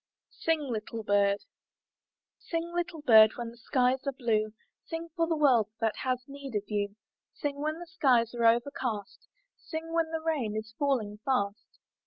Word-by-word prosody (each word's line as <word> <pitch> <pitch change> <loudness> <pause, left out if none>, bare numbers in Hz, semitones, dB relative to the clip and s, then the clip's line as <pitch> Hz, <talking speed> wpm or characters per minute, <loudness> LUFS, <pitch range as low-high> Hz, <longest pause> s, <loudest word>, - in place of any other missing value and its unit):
SING, 325 -1 +1
LITTLE 230 -4 -4
BIRD 200 -1 +2 1.0
Sing, 335 0 -3
little 345 -3 -3
bird, 220 -4 +8
when 235 -1 -5
the 235 - -16
skies 255 +3 +1
are - - +2
blue; 220 -5 0 0.4
Sing, 330 0 -5
for 330 -1 +1
the 325 -1 0
world 250 -8 +4 0.3
has 255 -1 -1
need 275 -3 -8
of 205 - 0
you; 205 -1 -1 0.4
Sing 285 -2 -3
when 310 +1 -1
the 345 - -8
skies 255 -10 +2
are 235 -1 0
overcast; 235 -3 -1 0.3
Sing 325 0 -6
when 330 -1 +1
the 320 0 -2
rain 295 -10 -1
is 220 0 -6
falling 230 -8 0
fast. 205 -5 -1
255 Hz, 160 wpm, -30 LUFS, 220-315 Hz, 1.0 s, bird